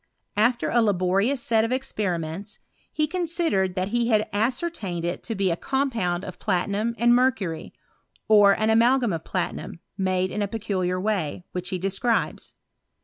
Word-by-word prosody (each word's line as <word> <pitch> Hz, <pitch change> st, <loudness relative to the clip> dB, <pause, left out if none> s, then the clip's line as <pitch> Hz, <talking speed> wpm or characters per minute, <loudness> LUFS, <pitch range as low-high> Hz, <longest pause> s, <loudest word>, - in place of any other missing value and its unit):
After 235 Hz, +4 st, +2 dB
a 240 Hz, -, +4 dB
laborious 200 Hz, +5 st, +1 dB
set 225 Hz, -2 st, +3 dB
of 225 Hz, -, -1 dB
experiments, 195 Hz, -6 st, -3 dB, 0.3 s
he 305 Hz, -, +1 dB
considered 325 Hz, -, 0 dB
that 185 Hz, +1 st, -1 dB
he 240 Hz, +1 st, +1 dB
had 215 Hz, -2 st, +2 dB
ascer* 245 Hz, +11 st, 0 dB
tained 180 Hz, -, -5 dB
it 175 Hz, +1 st, -2 dB
to 225 Hz, -, -5 dB
be 195 Hz, -2 st, +1 dB
a -, -, +1 dB
compound 225 Hz, -8 st, -1 dB
of 185 Hz, -, -8 dB
platinum 205 Hz, +5 st, 0 dB
and 240 Hz, 0 st, +4 dB
mercury, 225 Hz, -10 st, 0 dB, 0.6 s
or 205 Hz, -2 st, +7 dB
an 220 Hz, +1 st, +2 dB
amalgam 235 Hz, -1 st, +3 dB
of 165 Hz, -1 st, -4 dB
platinum 180 Hz, -2 st, -4 dB, 0.2 s
made 185 Hz, 0 st, 0 dB
in 210 Hz, -, -2 dB
a 205 Hz, -, 0 dB
peculiar 190 Hz, -4 st, -2 dB
way^ 185 Hz, -6 st, -2 dB
which 180 Hz, 0 st, -4 dB
he 185 Hz, -, -2 dB
describes. 195 Hz, +6 st, -1 dB
205 Hz, 160 wpm, -25 LUFS, 185-240 Hz, 0.6 s, or